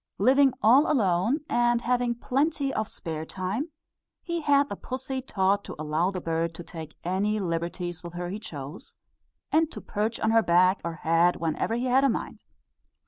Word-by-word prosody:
Living 270 +1 +5
all 255 +9 +6
alone, 220 - +2
and 240 0 +2
having 245 0 +1
plenty 275 +3 0
of 215 -1 -1
spare 160 -2 -5
time, 190 - -3 0.5
he 340 -1 -2
had 285 -1 +3
the - - -5
pussy 260 0 -5
taught 200 -4 +1
to - - -8
allow 155 +4 0
the 190 -2 -4
bird 165 0 -2
to 175 - -8
take 160 -2 -9
any 200 +4 0
liberties 175 -1 -3
with 170 -1 -8
her 175 0 -4
he 200 +3 -4
chose, 155 - -9 0.5
and 320 0 +3
to - - -7
perch 215 +2 -2
on 220 - +1
her 225 0 +5
back 185 0 +3
or 170 -1 -3
head 165 +2 +3
whenever 165 +7 -1
he 240 +2 -1
had 255 +2 +3
a 275 - +4
mind. - - -4
205 Hz, 180 wpm, -27 LUFS, 170-255 Hz, 0.5 s, all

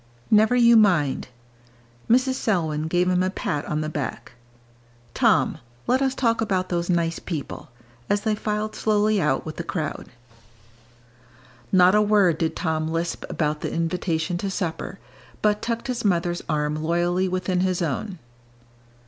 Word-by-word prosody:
"Never 220 +3 +5
you 235 -1 +6
mind." 175 -13 +3 0.8
Mrs. 255 +3 +3
Selwyn 160 -10 -1
gave 175 +2 +1
him 180 0 +2
a 185 - +1
pat 150 -5 -3
on 150 0 -2
the 155 - -2
back. 150 -3 -5 0.8
"Tom, - - +2 0.3
let 260 +2 +2
us 265 -1 +1
talk 230 -3 +1
about 190 -4 0
those 175 0 -2
nice 170 -2 0
people," 155 -6 -6 0.4
as 205 0 +1
they 220 0 0
filed 210 0 -2
slowly 210 -1 +2
out 150 -4 0
with 155 - -7
the 170 - -3
crowd. 160 -3 -4 1.6
Not 185 0 +6
a 210 - +5
word 205 -6 +3
did 165 -1 -1
Tom 160 -2 -1
lisp 165 +1 -3
about 150 -1 -1
the - - -3
invitation 165 0 -1
to 200 - -2
supper, 185 0 -4 0.5
but 210 0 +2
tucked 230 0 -3
his 250 -3 -3
mother's 175 -3 0
arm 150 -1 0
loyally 175 +3 0
within 185 0 -1
his 185 -1 0
own. 180 +6 -3
180 Hz, 150 wpm, -24 LUFS, 160-210 Hz, 1.6 s, you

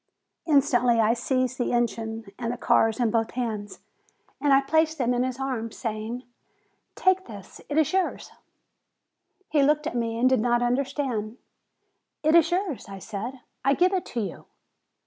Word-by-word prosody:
Instantly 250 -5 +3
I 220 +1 +4
seized 255 +1 -1
the 245 - 0
engine 225 -1 -1
and 235 -1 -2
the 245 - -4
cars 225 -2 +2
in 235 -3 +2
both 225 0 +1
hands, 220 -4 -4 0.6
and 275 -1 +4
placed 315 +1 +2
them 250 -2 +1
in 245 - +1
his 255 0 -2
arms, 245 -5 -3
saying: 225 +2 -4 0.7
"Take 375 0 +2
this; 205 -4 -11
it 295 - -1
is 315 +2 +2
yours." 380 -1 -1 1.2
He 295 - +2
looked 300 +2 +3
at 320 - -2
me, 230 -1 -1
and 245 +2 +3
did 260 -2 +3
not 240 +1 +2
understand. 250 -3 -1 0.9
"It 310 +1 +3
is 335 -1 +6
yours," 355 - -2
I 195 - -7
said; 225 +7 -6 0.2
"I 275 +1 +3
give 365 +4 +3
it 370 - -1
to 235 - -3
you." 200 - -6
245 Hz, 165 wpm, -26 LUFS, 230-285 Hz, 1.2 s, is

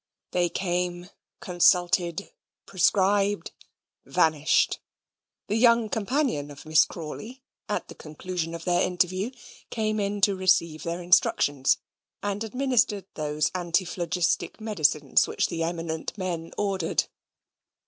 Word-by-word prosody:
They 175 -1 +1
came, 180 0 -2 0.3
consulted, 175 - +2 0.3
prescribed, 200 +2 +2 0.5
vanished. 155 -1 +2 0.7
The 215 - -1
young 235 -1 +4
companion 225 - -1
of 145 -1 -12
Miss 155 0 +5
Crawley, 215 - -8 0.3
at - - -2
the - - -10
conclusion 165 +2 -5
of 165 - -8
their 175 -1 +2
interview, 185 +4 0 0.4
came 215 -1 -1
in 205 0 -1
to 200 0 +4
receive 175 -4 +2
their 170 +1 -4
instructions, 145 -6 +3 0.5
and 205 +1 -2
administered 245 -4 0
those 150 0 -1
antiphlogistic 175 -1 -1
medicines 165 -9 +2
which - - -1
the 165 - -3
eminent 165 +1 -3
men 170 -4 -4
ordered. 195 -5 0
180 Hz, 110 wpm, -26 LUFS, 165-205 Hz, 0.7 s, Miss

